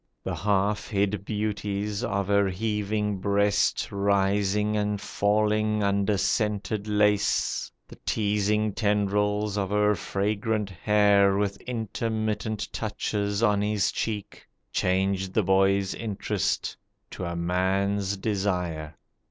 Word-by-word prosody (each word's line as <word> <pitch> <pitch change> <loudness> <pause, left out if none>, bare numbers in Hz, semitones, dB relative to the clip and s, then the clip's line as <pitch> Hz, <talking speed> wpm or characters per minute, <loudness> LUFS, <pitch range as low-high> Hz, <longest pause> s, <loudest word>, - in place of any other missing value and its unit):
The - - -3
half 105 +1 0
hid 100 -1 -1
beauties 105 0 -2
of 100 -4 -1
her 100 -1 +3
heaving 105 0 -1
breast 100 +1 +1
Rising 100 +1 +1
and 105 -1 0
falling 105 +1 +1
under 100 +1 +1
scented 105 +1 -1
lace, 105 -1 +1 0.2
The - - -13
teasing 105 0 +1
tendrils 105 0 +1
of 95 -2 -1
her 105 0 +3
fragrant 105 +1 -1
hair, 100 0 +3
With 100 -1 -1
intermittent 110 -2 -3
touches 105 -1 -2
on 105 -3 +3
his 105 -1 +1
cheek, 105 -3 -4 0.3
Changed 95 0 0
the 110 - +3
boy's 95 +1 +2
interest 110 -4 -2 0.4
to 90 - -5
a 85 0 -3
man's 95 +3 0
desire. 90 -7 -2
100 Hz, 110 wpm, -26 LUFS, 100-105 Hz, 0.4 s, her